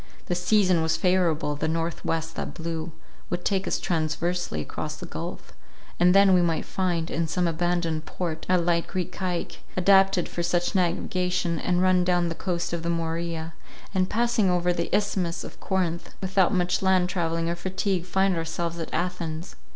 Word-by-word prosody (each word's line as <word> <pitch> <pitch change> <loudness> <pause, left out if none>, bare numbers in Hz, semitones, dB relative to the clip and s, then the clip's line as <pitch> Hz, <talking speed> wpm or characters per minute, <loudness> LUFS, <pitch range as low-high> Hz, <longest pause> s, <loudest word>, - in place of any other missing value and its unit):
The - - -1
season 180 -1 +3
was 160 0 +1
favourable; 170 -5 +2
the 150 +2 -2
north 165 +1 -2
west 165 0 -2
that - - -5
blew 165 0 -4 0.4
would 175 0 -3
take 195 -1 +1
us - - 0
transversely 170 - -1
across 75 - -4
the - - -8
gulph; - - -7 0.5
and 180 +1 +5
then 195 -1 +7
we 180 - +5
might 165 -2 0
find, 175 -4 -1
in 165 +1 0
some 175 +2 0
abandoned 170 -1 -1
port, 165 -3 -4
a 185 - +5
light 170 -1 +1
Greek 185 -2 -3
caique, 180 -2 -3 0.2
adapted 195 0 +4
for 175 - -4
such 175 +1 0
navigation, 180 -1 0
and 180 0 +1
run 185 -1 +4
down 175 -1 +2
the - - -2
coast 175 -1 -2
of 170 - -1
the 170 - -2
Morea, 165 -1 -2 0.4
and, 185 -1 +1
passing 235 -3 +2
over 180 0 +2
the 170 -1 -2
Isthmus 190 -5 0
of - - -10
Corinth, 180 -3 -2
without 190 -1 +2
much 180 -1 +1
land 190 -2 +3
travelling 165 -2 -1
or 170 - 0
fatigue, 185 0 -2
find 190 0 +2
ourselves 165 +1 -3
at 165 - -5
Athens. 170 -2 -3
175 Hz, 175 wpm, -26 LUFS, 165-185 Hz, 0.5 s, then